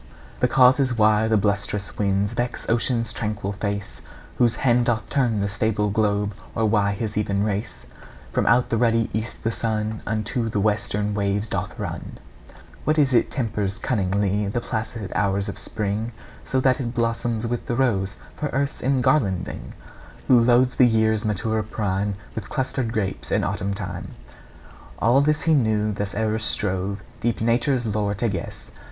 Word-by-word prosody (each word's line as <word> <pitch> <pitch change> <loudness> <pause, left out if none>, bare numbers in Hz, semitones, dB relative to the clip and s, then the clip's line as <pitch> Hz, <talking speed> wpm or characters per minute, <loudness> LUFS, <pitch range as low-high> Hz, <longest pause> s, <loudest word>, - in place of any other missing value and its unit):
The 125 - +3
causes 130 0 +4
why 110 0 +4
the 110 -1 +3
blusterous 100 0 -1
winds 100 0 0
Vex 120 0 -3
ocean's 115 0 +1
tranquil 105 -2 -3
face, 100 - -4 0.4
Whose 120 -2 +4
hand 120 -1 +2
doth 115 -2 -1
turn 125 -6 +2
the 100 - +1
stable 105 0 0
globe, 105 -1 +1 0.2
Or 110 - +1
why 105 -2 +2
his 105 +1 -4
even 100 -1 0
race 105 - -3 0.5
From - - 0
out 120 +2 +4
the 115 - +2
ruddy 115 -1 +2
east 110 +2 -4
the 115 - +1
sun 110 -1 -2
Unto 115 +2 -1
the 105 - -1
western 105 0 0
waves 100 +1 0
doth - - -3
run: - - -5 0.7
What 155 +1 +1
is 140 -4 +3
it 120 - +3
tempers 105 -6 -2
cunningly 100 -3 0
The 105 +4 -1
placid 110 -3 -4
hours 100 -1 +1
of 100 +1 -3
spring, 110 +2 -2 0.3
So 130 - 0
that 130 0 +3
it 120 -2 -3
blossoms 115 -1 0
with 120 0 -3
the 120 - 0
rose 105 -7 +1 0.2
For 150 - -2
earth's 140 0 -2
engarlanding: 125 - 0 0.5
Who 125 - +7
loads 125 +2 +4
the 125 - +5
year's 110 -1 +2
maturer 110 +1 0
prime 100 -2 -2 0.2
With 105 -2 -6
clustered 130 -3 -1
grapes 105 -4 -3
in - - +2
autumn 100 +1 -2
time: 95 -3 -6 0.8
All 120 +5 +4
this 150 +1 +1
he 165 - +3
knew 110 -6 +2
thus 100 -1 -4
ever 110 +1 0
strove 100 -1 -1 0.2
Deep 120 -1 0
Nature's 120 +2 +1
lore 105 -1 0
to 115 +4 0
guess. 95 - -6
110 Hz, 165 wpm, -23 LUFS, 100-120 Hz, 0.8 s, Who